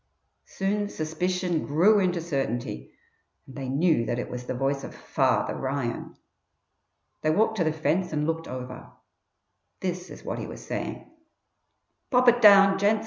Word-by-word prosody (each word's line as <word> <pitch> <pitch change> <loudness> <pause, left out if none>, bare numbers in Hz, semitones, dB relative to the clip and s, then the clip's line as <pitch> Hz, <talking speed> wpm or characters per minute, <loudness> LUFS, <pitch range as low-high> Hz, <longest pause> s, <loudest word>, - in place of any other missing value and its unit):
Soon 205 +1 -1
suspicion 175 +1 -2
grew 185 +9 +4
into 180 -3 +1
certainty, 130 - -3 0.5
and 135 - -13
they 135 -2 -5
knew 155 -1 +2
that 120 - -1
it 125 - -4
was 125 0 -6
the - - -2
voice 135 +2 -1
of - - -8
"Father" - - 0
Ryan. 130 -3 -3 1.1
They 155 - +1
walked 220 +7 +2
to 175 - +2
the 155 - +1
fence 160 +4 0
and 150 -1 -1
looked 165 +1 -2
over. 125 -1 -8 0.9
This 180 -1 -4
is - - -11
what - - -4
he - - -5
was - - -10
saying: - - -4 1.0
"Pop 250 -1 +3
it 240 0 +2
down, 195 -2 +7
gents! 210 +2 +3
160 Hz, 155 wpm, -26 LUFS, 135-195 Hz, 1.1 s, down